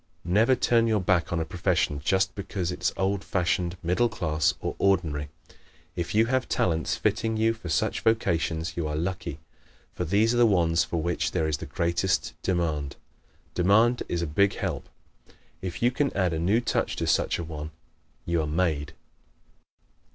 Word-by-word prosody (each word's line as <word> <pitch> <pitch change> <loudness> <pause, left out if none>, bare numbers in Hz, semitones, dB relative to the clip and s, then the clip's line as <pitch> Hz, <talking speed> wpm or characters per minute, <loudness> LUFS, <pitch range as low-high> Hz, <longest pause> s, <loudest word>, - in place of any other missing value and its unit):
Never 110 +9 +4
turn 115 -1 +3
your 110 -2 +2
back 90 -2 +1
on 85 - 0
a 80 - -1
profession 75 -4 0
just 95 +4 +1
because 95 -3 -3
it - - -7
is - - +2
old 95 +1 0
fashioned, 90 -1 -1
middle 90 +8 +2
class 80 -9 0
or - - -4
ordinary. 80 -7 +1 0.7
If 85 +3 -3
you 110 +1 +5
have 130 +2 0
talents 80 -2 0
fitting 110 0 0
you 110 +1 +2
for 110 -6 -9
such 75 - 0
vocations 85 -7 0
you 85 -3 -2
are 75 - -3
lucky, 85 -2 -3 0.6
for - - -3
these 105 +7 +2
are - - 0
the 120 -1 +6
ones 85 -5 +3
for 85 - -3
which 85 +2 -1
there 80 - +1
is 75 -1 0
the - - -8
greatest 85 +2 0
demand. 80 -6 -1 0.6
Demand 110 +7 +3
is 85 -1 -1
a - - 0
big 95 +6 +2
help. - - -4 0.7
If 95 +3 -5
you 120 - +4
can 140 +2 0
add 90 -3 +1
a 80 - -1
new 100 +8 +2
touch 120 - -1
to - - -2
such - - +1
a 85 - -4
one 75 -2 -6 0.6
you 85 -1 +1
are 75 - -2
made. 80 -2 -1
90 Hz, 180 wpm, -26 LUFS, 80-105 Hz, 0.7 s, the